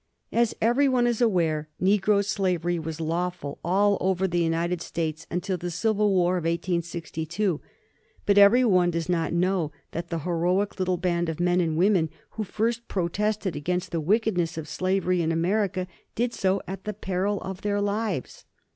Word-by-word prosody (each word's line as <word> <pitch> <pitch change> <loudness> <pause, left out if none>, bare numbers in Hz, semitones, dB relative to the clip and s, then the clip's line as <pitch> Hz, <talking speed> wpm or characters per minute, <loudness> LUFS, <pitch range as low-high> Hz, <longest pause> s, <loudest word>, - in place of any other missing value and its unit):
As 235 -1 +2
every 255 +5 +4
one 250 -2 +3
is 240 -1 0
aware, 165 -9 +1
negro 200 +1 +3
slavery 175 -3 0
was 160 0 -5
lawful 165 -2 -3
all 200 +3 +2
over 190 0 +1
the 175 -1 0
United 170 +1 0
States 160 -2 -3
until 185 +2 -2
the 175 +1 -4
civil 210 +4 +1
war 180 -1 +2
of 175 - -3
1862. 170 +1 -2 0.6
But 200 0 +5
every 230 +6 +7
one 180 -5 +4
does 165 -1 -2
not 170 -2 0
know 175 -2 +1 0.2
that 170 +1 -5
the 170 - -2
heroic 180 +5 0
little 185 -1 +1
band 175 -1 0
of 160 - -4
men 175 +1 +3
and 160 -2 0
women 180 -3 +3 0.2
who 220 - -3
first 230 +3 -2
protested 200 +1 -1
against 180 +5 -2
the 165 -2 -1
wickedness 180 -2 +1
of 155 -2 -5
slavery 185 0 0
in 165 0 0
America 185 +2 0 0.3
did 240 +1 0
so 190 -1 0
at 190 0 -6
the 210 - -2
peril 195 +1 -1
of 190 0 -6
their 205 0 0
lives. 205 - -2
180 Hz, 170 wpm, -26 LUFS, 170-205 Hz, 0.6 s, every